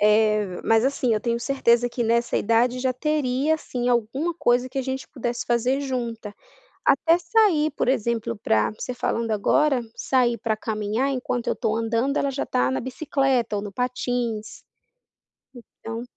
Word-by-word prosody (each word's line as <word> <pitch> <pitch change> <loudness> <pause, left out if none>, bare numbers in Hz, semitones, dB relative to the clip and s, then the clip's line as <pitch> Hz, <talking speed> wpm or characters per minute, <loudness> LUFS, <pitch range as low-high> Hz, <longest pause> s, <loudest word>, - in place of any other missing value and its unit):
eh, 210 -3 +2
mas, 225 +1 +3
assim, 255 -4 +1
eu 215 - -1
tenho 235 -1 -1
certeza 245 -1 +2
que 240 0 -3
nessa 235 +1 +1
idade 235 +3 +2
já 260 -1 +1
teria, 295 +1 0
assim, 250 -5 -3
alguma 250 +8 0
coisa 255 -5 +2
que 270 - -5
a - - 0
gente 265 0 -4
pudesse 240 -3 -4
fazer 245 +3 +1
junta. 235 -6 -4 0.5
Até 335 +1 +4
sair, 355 - +2
por 245 - -1
exemplo, 230 -2 0
pra 110 - +1
você 245 +3 -6
falando 230 -2 -1
agora, 270 +6 +2 0.2
sair 245 -3 +1
pra 220 0 -1
caminhar, 215 +5 -1
enquanto 250 -2 -2
eu - - +1
estou 215 - -1
andando, 230 +5 0
ela 280 - +1
já 270 - -3
está 125 +1 +1
na 130 - -1
bicicleta 260 -4 0
ou 200 - -2
no 205 -1 -7
patins, 245 -2 -3 1.2
então 225 +1 -5
245 Hz, 165 wpm, -24 LUFS, 225-265 Hz, 1.2 s, Até